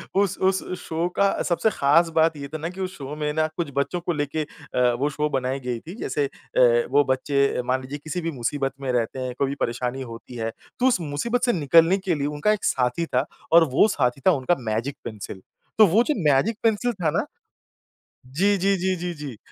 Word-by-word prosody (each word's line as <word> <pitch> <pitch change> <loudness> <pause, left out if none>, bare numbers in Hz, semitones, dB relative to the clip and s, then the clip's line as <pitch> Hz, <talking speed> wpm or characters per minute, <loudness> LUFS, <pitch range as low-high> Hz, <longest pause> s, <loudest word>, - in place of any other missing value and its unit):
उस 200 -2 +2
उस 190 0 +2 0.2
शो 165 +2 -2
का 200 0 +2
सबसे 175 +5 +1
ख़ास 160 +5 +3
बात 160 -1 +3
ये 140 0 -6
था - - -2
ना 160 +2 -4
कि 185 +2 -8
उस 185 0 -4
शो 140 +1 -6
में 150 -1 -2
ना 155 0 +2
कुछ 170 -4 -2
बच्चों 140 +5 0
को 175 -1 -1
लेके 150 +1 -2
अ, 125 -4 -1
वो 145 +2 +1
शो 150 +1 -1
बनाई 130 0 -1
गई 125 -2 -3
थी 175 - -10
जैसे 145 -1 -1
अ, 120 -3 +2
वो 145 +1 +5
बच्चे 140 0 +1
मान 130 +1 0
लीजिए 135 +3 -6
किसी 175 +3 -3
भी 165 0 -2
मुसीबत 135 +1 -2
में 130 -2 -1
रहते 120 +2 -1
हैं, 130 -1 -3
कोई 140 - +2
भी 140 - -3
परेशानी 125 +2 -2
होती 115 0 -9
है, 115 -1 -3 0.3
तो 255 - +4
उस 250 - +3
मुसीबत 170 +12 -2
से 240 - +2
निकलने 165 +3 +4
के 190 -3 -1
लिए 145 -1 -1
उनका 150 +8 +1
एक 210 - -4
साथी 125 +6 +1
था 130 -2 0 0.3
और 165 0 +8
वो 210 - +6
साथी 130 - 0
था - - +8
उनका 145 +2 +1
मैजिक 120 +6 -2
पेंसिल। 100 -3 -7 0.4
तो 215 - +9
वो 210 +7 +4
जो 300 - 0 0.2
मैजिक 205 +12 +2
पेंसिल 225 +2 +2
था 175 -7 -1
ना - - 0 1.0
जी, 195 +10 +2
जी, 195 +2 +2
जी, 185 +1 0
जी, 175 0 -4
जी। 145 -6 -7
150 Hz, 220 wpm, -24 LUFS, 130-180 Hz, 1.0 s, तो